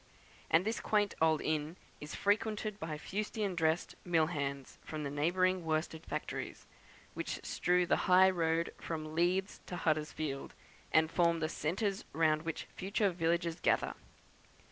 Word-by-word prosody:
And 165 +4 +4
this 220 +1 -1
quaint 210 -1 +1
old 160 -1 +3
inn 155 +2 -1 0.2
is 150 +1 -7
frequented 210 0 0
by 160 -5 -4
fustian 205 +3 -2
dressed 160 -1 +1
mill 165 -3 +3
hands 140 -2 -4
from 155 -1 -5
the 140 - -3
neighbouring 180 +5 +2
worsted 160 0 -2
factories, - - -4 0.5
which - - -3
strew 180 0 +2
the - - +3
high 190 +1 +7
road 165 -2 0
from 155 -2 -5
Leeds 180 +4 +1
to 180 - -4
Huddersfield, 155 -3 -2 0.4
and 160 0 +4
form 170 -1 +3
the 155 -1 -1
centres 190 +6 -1
round 155 0 +3
which 165 -1 -4
future 200 +1 +1
villages 170 0 0
gather. - - +2
165 Hz, 145 wpm, -34 LUFS, 155-185 Hz, 0.5 s, high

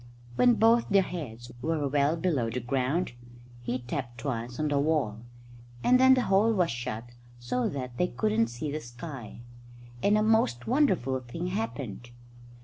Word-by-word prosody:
When 245 - +5
both 230 +1 +4
their 200 -2 +5
heads 125 -10 -7
were 155 0 0
well 145 +3 +2
below 155 -10 0
the 120 +3 -3
ground, 130 +7 -1 0.5
he 120 +1 -2
tapped 125 -1 -5
twice 125 -3 -4
on 155 -1 0
the 145 -1 +2
wall; 140 -8 0 0.6
and 255 +1 +5
then 260 0 +7
the 255 - +1
hole 200 +4 +3
was 180 -5 +2
shut 120 -1 -5 0.3
so 120 +1 -1
that 125 -3 -6
they 180 - +3
couldn't 110 -4 +1
see 120 +6 -5
the 155 +1 -3
sky, 120 -2 -9 0.6
and 205 +1 +4
a 215 - +2
most 215 - +2
wonderful 190 - +2
thing 130 +9 -5
happened. 140 - -4
140 Hz, 160 wpm, -28 LUFS, 120-180 Hz, 0.6 s, then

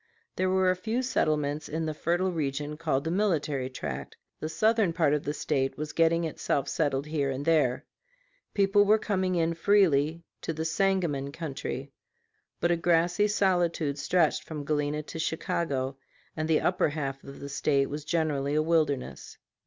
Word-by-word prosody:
There 185 0 +1
were 185 0 +3
a - - 0
few 225 +7 -2
settlements 150 - 0
in 160 +1 -2
the 155 - -2
fertile 175 +4 0
region 150 -2 -2
called 150 -4 -1
the 160 - -2
Military 155 -9 0
Tract; 70 - -6 0.2
the 155 - -4
southern 215 0 +2
part 160 -4 +2
of 150 - -1
the 145 - 0
State 135 -2 -1
was 150 +1 -5
getting 165 0 +3
itself 145 -3 -1
settled 140 -4 0
here 150 -3 -1
and 135 +1 -3
there. 150 -6 +2 0.7
People 200 0 +4
were 210 +2 +5
coming 190 -4 0
in 165 -1 +1
freely 165 -4 +3 0.2
to 165 - -3
the 160 +1 -3
Sangamon 165 -6 0
country. 140 -3 -5 0.7
But 170 - +2
a 170 - +2
grassy 175 +4 +2
solitude 175 -7 +1
stretched 180 +4 +2
from 150 -3 -6
Galena 150 0 -1
to 160 - -8
Chicago, 140 -4 -2 0.4
and 155 0 -2
the 155 - +3
upper 180 -2 +2
half 135 -2 -4
of 140 - -10
the 140 - -7
State 140 0 +1
was 150 +1 -5
generally 150 -3 0
a 155 - +3
wilderness. 155 -5 -1
155 Hz, 170 wpm, -28 LUFS, 140-175 Hz, 0.7 s, were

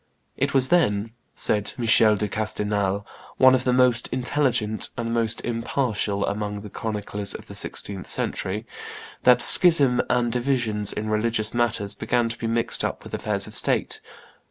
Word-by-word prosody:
"It 140 +1 -2
was 130 -1 +4
then," 110 -11 +1 0.2
said 105 -1 +1
Michael 110 -2 +4
de 105 +1 -2
Castelnau, 105 -1 -2 0.3
one 130 0 +6
of 130 0 0
the 125 - +2
most 125 -1 +3
intelligent 120 -4 0
and 115 0 -3
most 115 -1 0
impartial 115 -4 -2
amongst 105 0 -4
the 105 - -10
chroniclers 105 -2 -3
of - - -9
the - - -12
sixteenth 95 -3 -3
century, 105 +4 -3 0.6
"that 125 -1 +6
schism 145 -9 +6
and 120 -1 +1
divisions 120 -5 0
in 110 - -5
religious 110 0 -1
matters 115 -4 -1
began 120 +1 -1
to 115 - -5
be 115 - -3
mixed 115 0 -1
up - - -4
with - - -13
affairs - - -2
of - - -11
state. - - 0
115 Hz, 155 wpm, -23 LUFS, 105-125 Hz, 0.6 s, one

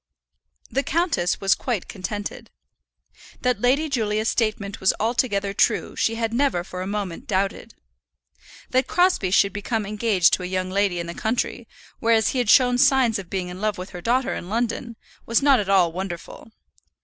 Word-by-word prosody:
The 275 - +1
countess 320 - 0
was 195 -1 +3
quite 235 -8 -3
contented. 205 +1 -6 0.9
That 250 -5 +1
Lady 270 +6 +2
Julia's 220 -5 0
statement 210 -3 -1
was 190 - +2
altogether 210 -3 0
true - - +1
she 225 - 0
had 225 0 -2
never 250 -9 +1
for 185 0 -7
a 185 - -4
moment 200 -4 -4
doubted. 195 0 -2 1.0
That 255 +1 +2
Crosbie 355 - +2
should 195 +1 +3
become 215 +1 -2
engaged 210 -3 +2
to - - +2
a 180 - -4
young 185 0 -2
lady 195 -2 +1
in 170 - -3
the 170 - -6
country, 230 +3 -2 0.3
whereas 225 -1 +3
he 260 - -1
had 240 -4 0
shown 250 0 +5
signs 250 -5 +4
of 185 -3 -9
being 185 -2 -3
in 180 +2 -8
love 215 -1 -1
with 180 +1 -7
her 180 - -8
daughter 245 +6 +1
in 175 - -6
London, 235 +1 -2 0.3
was 230 +4 +2
not 275 -3 +5
at 200 -2 -3
all 185 -4 +4
wonderful. 185 +4 -7
210 Hz, 175 wpm, -23 LUFS, 190-240 Hz, 1.0 s, shown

